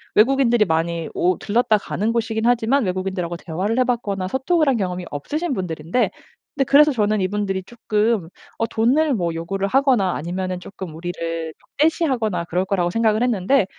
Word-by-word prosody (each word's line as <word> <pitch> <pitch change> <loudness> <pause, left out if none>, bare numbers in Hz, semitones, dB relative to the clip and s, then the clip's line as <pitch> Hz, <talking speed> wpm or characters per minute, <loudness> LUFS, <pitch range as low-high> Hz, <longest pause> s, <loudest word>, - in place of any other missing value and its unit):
외국인들이 240 -1 +4
많이 165 -1 -1
오 180 0 +1
들렀다 220 0 +2
가는 210 +2 -2
곳이긴 225 -1 -1
하지만 245 +3 +3
외국인들하고 185 -2 -2
대화를 185 +9 -2
해봤거나 230 -7 0
소통을 295 - +1
한 265 -3 +3
경험이 180 -3 -3
없으신 300 - -3
분들인데 175 +2 -1 0.5
근데 275 -2 +1
그래서 295 +3 +6
저는 215 -4 +1
이분들이 195 0 -1
조금 220 -3 -1 0.3
어 225 - +1
돈을 265 +8 +2
뭐 170 -5 -1
요구를 195 +4 -2
하거나 250 -6 +3
아니면은 180 +3 -3
조금 185 -2 -8
우리를 165 -1 -4
적대시하거나 260 - 0
그럴 180 +3 -1
거라고 185 -3 0
생각을 220 +1 +2
했는데 235 0 +2
210 Hz, 415 characters per minute, -21 LUFS, 180-245 Hz, 0.5 s, 그래서